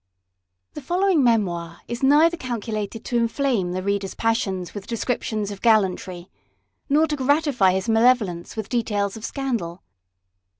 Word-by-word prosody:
THE 300 - -7
following 355 +1 +2
Memoir 175 -8 0
is 235 0 -5
neither 300 +5 +5
calculated 225 - -5
to 240 - -1
inflame 230 -5 0
the 185 0 -3
reader's 200 -1 -2
passions 195 -6 -1
with 200 -1 -8
descriptions 220 -3 -2
of 200 - -9
gallantry, 190 -5 +1 0.6
nor 300 +3 +4
to 305 -1 -2
gratify 280 - +2
his 190 0 -2
malevolence 225 -6 +2
with 220 -2 -4
details 205 -4 -1
of 220 - -10
scandal. 230 - -3
225 Hz, 135 wpm, -23 LUFS, 195-260 Hz, 0.6 s, neither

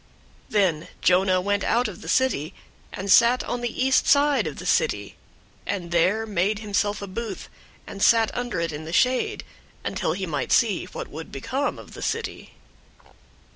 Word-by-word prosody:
004:005 - - -33
Then 180 -7 +2 0.2
Jonah 185 0 +4
went 200 +1 0
out 240 +1 +2
of 210 - -9
the - - -10
city, 195 - +1 0.4
and 195 +1 -3
sat 235 +4 +6
on 245 - -3
the 240 +2 -1
east 265 0 +3
side 285 0 +4
of - - -6
the - - -8
city, 485 - 0 0.5
and 180 -4 -3
there 185 +6 +2
made 200 0 0
himself 205 -1 -1
a - - -5
booth, 225 +4 -6 0.4
and 200 - -9
sat 225 0 +4
under 245 -7 -2
it 170 0 -1
in 155 +1 -7
the 165 - -7
shade, 255 +6 +1 0.4
until 155 - -1
he 190 +2 -3
might 150 -6 -3
see 210 -6 +3
what - - -7
would 160 +2 -9
become 265 - -2
of - - -12
the - - -9
city. - - -4
205 Hz, 175 wpm, -24 LUFS, 180-235 Hz, 0.5 s, sat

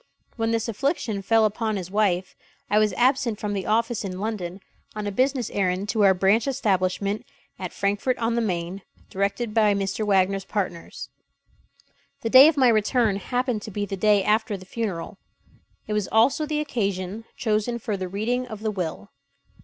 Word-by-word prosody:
When 225 -1 -1
this 230 0 0
affliction 230 - -1
fell 225 +2 +3
upon 215 +1 -1
his 185 -2 -5
wife, 195 -3 0 0.4
I 210 - +5
was 215 -1 +3
absent 250 -3 +1
from 210 -1 -3
the 195 -2 -3
office 230 +1 +1
in 185 -2 -5
London 195 -4 -4 0.4
on 210 -1 -4
a 205 - -2
business 255 +2 0
errand 190 +1 -1
to 220 0 +1
our 190 -1 +6
branch 195 +7 +3
establishment 200 -5 0 0.4
at 185 -2 -5
Frankfort 205 +6 0
on 230 0 0
the 235 - +1
Main, 180 -2 -3 0.3
directed 200 +4 -1
by 210 -2 +4
Mr. 195 +2 -2
Wagner's 195 -1 +2
partners. 195 +7 -4 1.1
The 225 - -2
day 265 +3 +10
of 315 -2 +2
my 260 -3 +5
return 220 -1 +2
happened 245 +1 -1
to 215 - -7
be 205 0 -3
the 195 - -4
day 205 0 +3
after 215 0 +1
the 185 - -13
funeral. 195 -4 -4 0.7
It 210 - -3
was 210 -2 0
also 270 +7 +3
the 300 0 -1
occasion 200 -5 -3
chosen 220 +1 0
for 220 -2 -3
the 185 -1 -4
reading 235 +7 -2
of 215 -3 -8
the 215 -1 -1
will. 165 - -5
210 Hz, 175 wpm, -24 LUFS, 195-230 Hz, 1.1 s, day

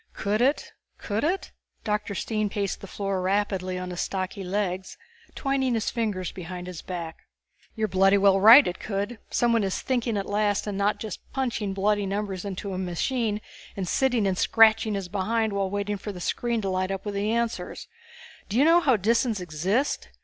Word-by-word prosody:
"Could 210 +3 -1
it? 275 +4 +1 0.2
Could 210 +1 -3
it?" 360 +6 -1 0.3
Dr. 210 -1 -2
Stine 215 +1 -1
paced 200 -1 -3
the 195 - -8
floor 195 0 -2
rapidly 190 -1 0
on 180 0 -5
his 175 - -3
stocky 190 +1 -3
legs, 185 -1 -2 0.4
twining 270 -3 0
his 225 - -1
fingers 210 -6 -2
behind 180 0 -7
his 180 -3 -7
back. 170 -3 -7 0.5
"You 220 -1 0
are - - -1
bloody 195 +1 +4
well 195 -1 +4
right 230 +8 +9
it 175 - -3
could. 205 +3 -3
Someone 235 -2 +2
is 190 -1 -1
thinking 240 -4 -1
at 195 - -2
last 205 0 0
and 205 -2 -3
not 205 +1 +1
just 215 -4 -5
punching 230 -7 -2
bloody 205 +1 +1
numbers 195 -1 -3
into 195 0 -4
a 185 - -3
machine 210 +4 -1 0.4
and 190 -2 -2
sitting 250 0 +2
and 190 -1 +1
scratching 220 -1 +4
his 195 -2 -3
behind 215 +3 0
while 195 -1 0
waiting 205 +1 -2
for 205 +2 -6
the 185 - -9
screen 235 +5 -1
to 195 - -2
light 185 0 -1
up 195 +1 -4
with 205 - -3
the 200 +2 -1
answers. 235 0 -2 0.6
Do 210 - -1
you 275 - +5
know 335 +2 +6
how 265 -9 +3
Disans 225 +2 +1
exist?" 180 - -1
205 Hz, 190 wpm, -26 LUFS, 190-225 Hz, 0.6 s, right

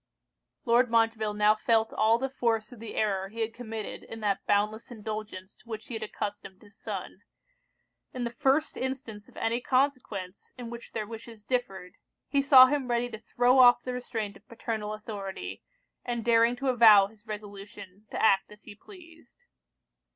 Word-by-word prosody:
Lord 240 +1 +4
Montreville 225 -2 +1
now 210 0 +5
felt 220 0 +1
all 225 +1 +3
the 265 +3 -2
force 230 -5 -1
of 245 - -12
the 225 -1 -8
error 195 -3 0
he 230 +2 -6
had 225 0 -2
committed 225 -3 -6
in 225 - -9
that 200 -2 0
boundless 210 +2 0
indulgence 215 -4 -7
to 235 - -24
which 220 -1 -6
he - - -6
had 225 - -4
accustomed 205 -2 -6
his 205 0 -18
son. - - -7 0.9
In 250 - -4
the 235 - -2
first 275 +6 +1
instance 255 -5 -5
of - - -19
any 230 +2 -1
consequence 250 -9 -1
in 240 -2 -7
which 235 0 -10
their 215 -2 -3
wishes 225 0 -10
differed, 195 -8 -3 0.3
he 280 - +2
saw 270 -2 +9
him 270 -1 -1
ready 240 0 0
to 220 - -7
throw 245 +3 +2
off 245 -1 +7
the 250 - -4
restraint 220 -4 -4
of - - -19
paternal 220 -2 -4
authority, 205 -3 -7 0.4
and 235 -2 -3
daring 230 0 +4
to 270 +2 -2
avow 220 -5 +7
his 215 +2 -16
resolution 205 -1 -9
to - - -5
act 195 -3 +3
as 210 0 -15
he 210 - -11
pleased. 335 - -17
225 Hz, 175 wpm, -28 LUFS, 210-245 Hz, 0.9 s, saw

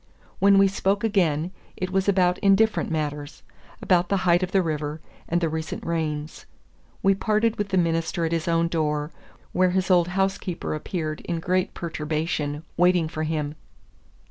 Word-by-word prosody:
When 200 0 +5
we 195 0 +6
spoke 195 +1 0
again, 175 -6 +1 0.3
it 185 0 -3
was 195 +1 +1
about 180 -2 +2
indifferent 215 +3 +3
matters, 150 -2 -4 0.4
about 180 -1 +3
the 200 - +2
height 175 0 +4
of 185 0 -2
the 190 -2 +3
river, 155 -1 -3 0.3
and 175 - +2
the 165 - +2
recent 160 0 -4
rains. 155 -2 -3 0.6
We 195 - +5
parted 215 +3 +1
with 205 -1 -2
the 190 - +1
minister 165 0 0
at 165 - -2
his 165 -1 -1
own 170 0 +2
door, 150 -2 -1 0.4
where 185 0 +3
his 185 +1 0
old 175 -2 +4
housekeeper 190 -1 -2
appeared 155 0 -4
in 170 -2 -2
great 185 +2 0
perturbation, 155 -2 -3
waiting 175 -2 +3
for 155 -1 -5
him. 155 -2 -2
170 Hz, 165 wpm, -24 LUFS, 155-190 Hz, 0.6 s, we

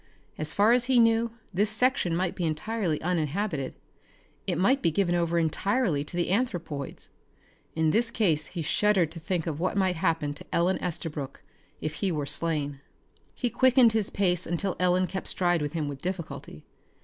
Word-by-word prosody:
As 155 0 -3
far 205 +5 +4
as 245 0 +3
he 260 -1 +3
knew, 230 0 +4 0.2
this 205 +4 +2
section 220 -6 +2
might 180 0 0
be 180 - -4
entirely 165 +1 -1
uninhabited. 160 -3 -1 0.7
It - - 0
might 255 - +3
be - - +3
given 175 +2 +1
over 170 -1 +1
entirely 170 - +1
to 175 - -6
the 175 0 0
anthropoids. 175 - -3 0.7
In 160 -1 +2
this 230 +4 +2
case 165 -11 +1
he 170 0 -5
shuddered 190 0 +2
to 165 - -6
think 165 0 -2
of 155 -2 -3
what 185 +3 -1
might 185 -3 +1
happen 160 -3 0
to 145 - -10
Ellen 175 +3 +1
Estabrook 155 -6 -4 0.4
if 155 - -3
he 195 -3 +1
were 150 -3 -2
slain. 145 -1 -1 0.6
He 245 -2 -1
quickened 255 -3 +5
his 220 -3 +2
pace 180 -3 +1
until 175 +3 -1
Ellen 180 0 +3
kept 190 +2 -5
stride 175 -3 +1
with 145 +1 -3
him 155 -3 -2
with 140 -1 -6
difficulty. 160 - -6
175 Hz, 175 wpm, -27 LUFS, 155-200 Hz, 0.7 s, quickened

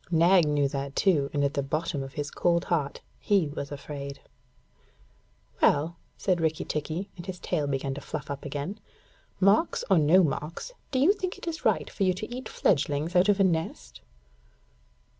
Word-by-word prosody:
Nag 170 0 +5
knew 145 -1 +2
that 140 0 -4
too, 150 -8 +3
and 145 -1 0
at 140 0 +1
the 140 - 0
bottom 150 +2 -2
of 135 0 -7
his 145 -1 -4
cold 170 0 +1
heart 145 -5 -1 0.2
he 195 -7 +2
was 145 -1 -6
afraid. 140 -1 -6 1.4
'Well,' 155 +4 +3 0.2
said 180 -3 +1
Rikki 160 -1 0
tikki, 160 +6 -3
and 175 0 -10
his 185 -1 -5
tail 155 -5 -1
began 135 0 -1
to 140 - -7
fluff - - -6
up 140 - -5
again, 145 +8 -4 0.6
'marks 200 - +3
or 185 - +6
no 165 +5 +5
marks, 155 - -3 0.2
do 260 - -1
you 300 +10 +5
think 370 -3 -4
it - - -10
is 325 -1 -4
right - - +2
for - - -11
you 185 -2 +3
to 215 +5 -6
eat 255 - -6
fledglings 150 +1 +1
out 180 +3 +5
of 205 -1 +3
a - - +6
nest?' 165 -3 -2
160 Hz, 180 wpm, -27 LUFS, 145-185 Hz, 1.4 s, or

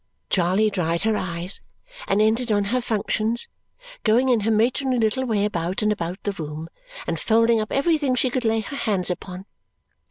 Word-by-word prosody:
Charley 190 +4 +2
dried 170 -2 0
her 220 0 +2
eyes 175 0 -2 0.5
and 210 - +3
entered 225 +2 +1
on 205 -1 +3
her 255 - +2
functions, 225 0 0 0.6
going 240 +4 +3
in 240 -3 +4
her 215 +1 -1
matronly 250 +4 +2
little 230 +3 +1
way 210 -4 +1
about 180 0 -2
and 210 - +3
about 180 -3 -4
the 205 - 0
room 155 -2 -6 0.4
and 165 -1 -2
folding 230 +2 +3
up 215 - -5
everything 285 -2 +2
she 250 +1 +1
could 255 0 -1
lay 225 -1 +2
her 280 +5 -7
hands 195 -7 0
upon. 180 +1 -6
215 Hz, 180 wpm, -23 LUFS, 185-235 Hz, 0.6 s, in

